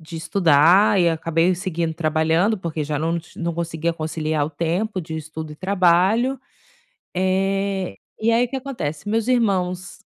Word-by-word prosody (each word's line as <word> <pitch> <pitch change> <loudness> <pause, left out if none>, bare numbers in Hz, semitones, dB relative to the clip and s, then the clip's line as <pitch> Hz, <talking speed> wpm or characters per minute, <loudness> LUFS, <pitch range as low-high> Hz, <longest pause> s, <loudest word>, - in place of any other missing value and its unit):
de 160 +1 -9
estudar 170 +4 +4
e 170 - +4
acabei 165 +2 +1
seguindo 170 -3 -3
trabalhando 160 +6 +1
porque 165 -4 -3
já 150 0 -2
não 165 +3 0 0.2
não 170 -1 -3
conseguia 165 0 -2
conciliar 155 -2 -2
o - - -7
tempo 175 +6 -2
de 160 -1 -6
estudo 155 0 -7
e - - -9
trabalho, 195 - +2 0.8
eh, 190 - 0 0.3
e 225 - +3
aí 235 +2 +4
o - - -17
que 270 - -4
acontece, 205 - -5
meus 225 +2 0
irmãos 190 -6 0
170 Hz, 155 wpm, -22 LUFS, 160-195 Hz, 0.8 s, estudar